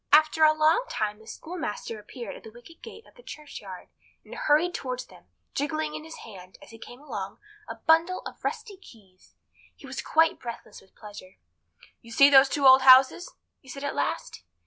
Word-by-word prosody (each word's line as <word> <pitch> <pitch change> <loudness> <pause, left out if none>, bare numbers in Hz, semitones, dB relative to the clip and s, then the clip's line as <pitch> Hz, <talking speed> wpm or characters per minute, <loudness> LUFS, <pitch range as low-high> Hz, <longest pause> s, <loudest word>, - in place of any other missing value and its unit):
* - - -53
After 310 +1 +4
a 310 - +7
long 310 +9 +2
time 210 0 -3
the 220 - -19
schoolmaster 230 -8 -6
appeared 235 +3 -9
at - - -12
the - - -12
wicket 240 +9 -17
gate 450 - -12
of - - -21
the - - -18
churchyard, 210 - -11 0.4
and - - -13
hurried 315 +4 +1
towards 255 -4 -5
them, - - -19 0.3
jingling 305 +1 -3
in - - -7
his 320 +1 -11
hand, 185 -4 -13
as - - -16
he 225 - -14
came 245 +2 -12
along, 200 -9 -7 0.3
a - - -6
bundle 330 +3 +1
of - - -10
rusty 430 -3 -5
keys. 195 - -20 0.4
He - - -15
was 265 -1 -6
quite 320 +1 +2
breathless 235 -3 -9
with 190 - -26
pleasure. 205 -3 -13 0.6
"You 230 - -16
see 275 +5 +6
those 270 0 +7
two 280 -1 -1
old 260 0 +8
houses?" 260 +6 +5 0.2
he 265 - -19
said 275 +2 -8
at 285 - -3
last. 145 -9 -4
270 Hz, 195 wpm, -26 LUFS, 220-315 Hz, 0.6 s, old